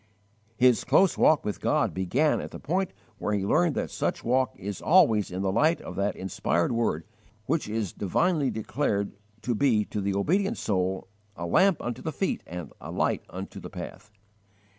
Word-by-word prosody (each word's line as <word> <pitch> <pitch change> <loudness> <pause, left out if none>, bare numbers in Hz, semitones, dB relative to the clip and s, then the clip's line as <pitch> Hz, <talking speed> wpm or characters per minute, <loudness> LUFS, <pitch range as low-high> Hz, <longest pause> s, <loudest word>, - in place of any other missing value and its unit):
His 125 -2 +4
close 190 -2 +4
walk 155 -1 +4
with 105 - -3
God - - +1
began 120 - +1
at - - -6
the - - -8
point 185 +5 -1 0.3
where 105 - -1
he 100 -1 -1
learned 160 - +2
that - - -2
such - - -2
walk 125 0 +1
is 100 0 -6
always 115 - +4
in 95 +1 -3
the 95 - +1
light 155 - +3
of 90 - -8
that 100 +2 0
inspired 90 0 0
word 115 -9 0 0.4
which 150 -4 -1
is 110 -3 -2
divinely 140 - +1
declared 110 -3 -1 0.3
to 125 - 0
be 115 -3 +2
to 105 - -4
the 100 0 -1
obedient 195 - +1
soul 95 -2 -1 0.3
"a 85 - -5
lamp 190 - +3
unto 120 +1 -4
the 160 - -3
feet 195 - -1
and 85 -3 -7
a - - -8
light - - 0
unto - - -7
the - - -8
path." 105 - -9
110 Hz, 185 wpm, -27 LUFS, 100-150 Hz, 0.4 s, His